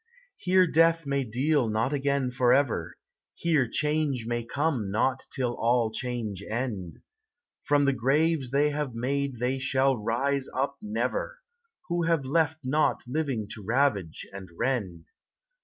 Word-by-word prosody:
Here 185 0 +4
death 165 -1 +3
may 140 -1 0
deal 130 +2 +1
not 110 +6 0
again 140 -2 0
forever; 125 - +2 0.4
Here 150 -8 +1
change 150 -4 0
may 120 0 -2
come 135 -4 -1
not 130 +6 0
till 125 -2 -1
all 120 -1 +1
change 110 -4 -4
end. 110 -7 -3 0.7
From 145 0 +2
the 140 - +3
graves 140 +2 +1
they 145 +3 +2
have 145 -4 -3
made 135 +2 -1
they 125 +3 -1
shall 135 0 +2
rise 130 +5 -1
up 140 +1 -1
never, 125 - -2 0.5
Who 170 -1 0
have 165 -4 +1
left 160 +3 +1
nought 150 +4 +1
living 130 -5 -2
to 105 - -9
ravage 110 - 0
and 95 -2 -8
rend. 95 -11 -2
130 Hz, 140 wpm, -27 LUFS, 115-145 Hz, 0.7 s, Here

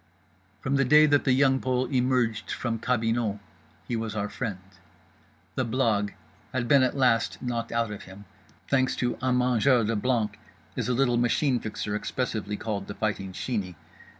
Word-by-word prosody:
From 140 +1 0
the 135 - +4
day 150 +4 +6
that 145 -1 +3
The 135 - +3
Young 135 0 +4
Pole 130 0 0
emerged 125 -4 +1
from 115 -2 -2
cabinot 115 -3 0 0.5
he 120 - -1
was 110 -1 -3
our 105 -1 -2
friend. 110 -7 -4 1.0
The 130 - 0
blague 115 -4 0 0.4
had 125 -2 -1
been 140 0 +6
at 130 +2 +1
last 115 -7 +2
knocked 120 -2 -3
out 115 -2 0
of 105 - -8
him, 95 +2 -12 0.4
thanks 130 -1 +2
to 120 -1 -1
Un 130 -1 +2
Mangeur 125 0 +3
de 115 +2 0
Blanc, 105 -2 0 0.4
as 120 -3 -2
the 125 - +1
little 120 -1 +2
Machine 120 +2 +2
Fixer 105 -1 -4
expressively 105 -2 -3
called 100 -3 -4
The 100 - -6
Fighting 100 -3 -2
Sheeney. 95 -3 -3
120 Hz, 170 wpm, -27 LUFS, 105-130 Hz, 1.0 s, day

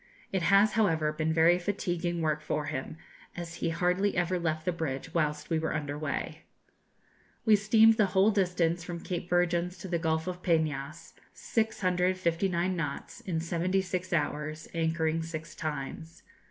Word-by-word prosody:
It 190 -2 0
has, 200 +4 +5
however, 165 -9 +2
been 155 +1 0
very 165 +2 +5
fatiguing 175 -3 -2
work 155 -1 0
for 150 0 -2
him, 155 +1 -4 0.4
as 170 -1 -5
he - - -1
hardly 180 +4 +1
ever 175 +1 +1
left 155 -2 -2
the 180 - +2
bridge 155 -6 -4
whilst 150 -1 -1
we 160 - +2
were 160 0 -2
under 145 -2 -3
way. 150 -1 -4 1.0
We 220 -2 +7
steamed 220 +2 +5
the 210 -3 +4
whole 190 +3 +4
distance 180 -4 +1
from 170 -1 -6
Cape 175 -1 -4
Virgins 175 0 +1
to 190 - -8
the 170 -2 -1
Gulf 160 -1 0
of 180 0 -5
Peñas, 155 -4 -1 0.2
659 185 -4 0
knots, 150 +2 -4
in 180 -8 -2
76 185 +2 -1
hours, 155 -1 -2
anchoring 160 -1 0
six 160 -1 -6
times. 155 +2 -6
170 Hz, 155 wpm, -29 LUFS, 160-185 Hz, 1.0 s, We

